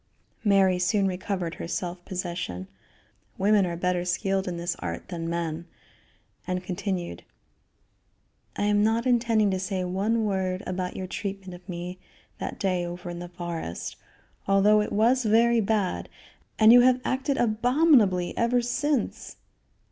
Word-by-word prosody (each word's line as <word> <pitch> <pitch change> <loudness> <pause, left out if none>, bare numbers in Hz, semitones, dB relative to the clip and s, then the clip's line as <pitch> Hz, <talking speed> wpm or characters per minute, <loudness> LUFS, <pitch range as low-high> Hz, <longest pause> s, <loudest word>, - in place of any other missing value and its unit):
Mary 195 -3 +4
soon 195 +2 +2
recovered 185 -2 -2
her - - -6
self 175 0 -4
possession 170 - -4 0.7
women 200 -1 +3
are 170 - -3
better 180 +1 0
skilled 190 +2 -1
in 175 -1 -3
this 170 +1 -2
art 85 -1 -5
than 165 -2 -4
men 170 0 -3 0.8
and 180 0 -2
continued: 185 -1 -4 1.3
"I - - -2
am 205 0 +3
not 225 +2 +1
intending 230 -4 +3
to 190 - -1
say 190 0 -2
one 205 +5 0
word 190 -1 -1
about 185 0 -3
your 190 - -4
treatment 195 0 -5
of 180 +2 -13
me 180 +1 -6 0.4
that - - -5
day 185 -3 0
over 175 0 -6
in 175 - -6
the 175 0 -7
forest, 170 - -5 0.5
although 200 +2 +5
it 210 - -3
was 240 +5 +3
very 230 +2 +4
bad, 205 -3 -1 0.5
and 220 +1 +7
you 245 - +9
have 255 0 +4
acted 270 +2 0
abominably 230 - +3
ever 235 +1 +2
since. 255 +1 -1
190 Hz, 145 wpm, -26 LUFS, 180-215 Hz, 1.3 s, you